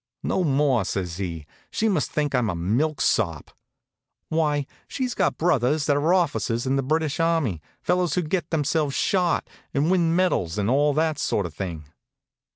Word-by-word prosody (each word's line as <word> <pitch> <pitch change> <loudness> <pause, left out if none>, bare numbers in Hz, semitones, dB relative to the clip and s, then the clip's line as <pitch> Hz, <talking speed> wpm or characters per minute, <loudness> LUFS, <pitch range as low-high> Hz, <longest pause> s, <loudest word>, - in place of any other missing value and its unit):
"No 185 - 0
more," 135 - +2
says 90 -3 -3
he. 85 -6 -4 0.2
"She 220 - 0
must 200 - +1
think 150 -2 -1
I'm 125 -4 +1
a 90 - -2
milksop. 105 - 0 0.8
Why, 150 -3 +1 0.2
she's 255 -3 -2
got - - 0
brothers 150 -3 +2
that 145 - +2
are 150 +4 +2
officers 145 -9 +1
in 130 +1 +1
the 135 - +1
British 155 +2 -1
army, 160 - +1 0.2
fellows 180 -3 +1
who 180 - +1
get 170 +1 -2
themselves 150 -2 0
shot, 180 -3 +1 0.3
and 150 +5 +2
win 170 -3 +2
medals, 140 - +1
and 105 +2 +1
all 145 +1 +3
that 155 -1 +1
sort 100 - 0
of 85 - -6
thing." 85 -1 -5
145 Hz, 165 wpm, -24 LUFS, 115-165 Hz, 0.8 s, all